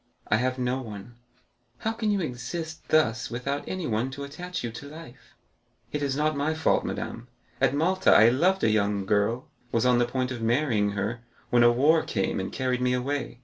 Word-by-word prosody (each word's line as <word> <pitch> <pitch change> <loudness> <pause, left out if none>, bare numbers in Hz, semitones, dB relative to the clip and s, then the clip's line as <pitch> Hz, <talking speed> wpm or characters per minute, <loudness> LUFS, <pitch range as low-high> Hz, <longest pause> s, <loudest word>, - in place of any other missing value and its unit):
"I 105 - +4
have 130 +2 0
no 125 +1 -1
one." 110 -1 -9 0.6
"How 220 - -2
can 225 -1 -2
you 200 -2 +1
exist 160 +3 -5
thus 125 -5 +2
without 135 +4 -3
anyone 130 -10 -1
to 140 +1 -7
attach 175 +6 -6
you 120 - -3
to 130 +5 -9
life?" 155 -5 -13 0.6
"It 150 - -2
is 140 -2 0
not 155 +1 +1
my 145 +3 0
fault, 160 - +2
madame. 115 +1 -5 0.3
At 135 0 +3
Malta, 185 +5 +3
I 110 +2 +7
loved 180 +10 +2
a 110 - +4
young 100 -2 +1
girl, 105 +5 +1 0.2
was 115 0 +1
on 125 -1 +4
the 120 - +2
point 130 0 -1
of 120 -3 -5
marrying 115 -4 +1
her, 105 +4 -2 0.3
when 120 - +5
war 155 +5 +4
came 95 -2 -1
and 95 - -4
carried 130 -1 -1
me 125 0 +2
away. 130 0 -2
130 Hz, 190 wpm, -26 LUFS, 115-150 Hz, 0.6 s, I